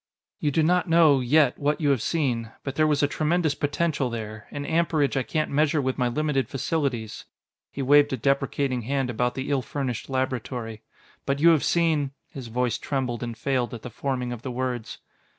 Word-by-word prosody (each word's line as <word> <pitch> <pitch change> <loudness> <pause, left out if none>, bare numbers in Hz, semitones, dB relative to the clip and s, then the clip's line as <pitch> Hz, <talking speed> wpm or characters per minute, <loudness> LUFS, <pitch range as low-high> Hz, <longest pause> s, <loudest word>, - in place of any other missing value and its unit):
"You 150 - +1
do 155 +3 +2
not 180 +3 +2
know, 160 -4 +6
yet, 135 +1 +3
what 150 +1 0
you 145 -3 +2
have 130 -5 +1
seen, 125 -9 -1
but 135 - -4
there 155 +2 +2
was 150 -2 +2
a - - +4
tremendous 155 +1 +1
potential 145 -1 -1
there 110 -2 -6
an 145 0 -5
amperage 160 -3 +1
I 135 - +2
can't 155 +4 -2
measure 150 +2 +2
with 130 -1 -1
my 125 - +2
limited 135 -1 0
facilities." 135 -6 -2 0.5
He 140 - -4
waved 145 +2 +5
a 130 - -1
deprecating 135 0 0
hand 135 +1 -1
about 125 +1 -1
the 135 +2 -3
ill 140 -2 +2
furnished 130 -3 -4
laboratory. 125 -4 -3 0.5
"But 140 0 +1
you 165 +3 +6
have 160 -4 +4
seen 155 -5 +1
" - - -41
His 130 -3 -7
voice 120 0 -1
trembled 130 -4 -2
and 120 -2 -5
failed 125 0 -1
at 115 - -10
the 125 - -7
forming 125 0 -3
of 115 - -8
the 130 - -5
words. 125 -2 -3
135 Hz, 200 wpm, -25 LUFS, 125-150 Hz, 0.5 s, know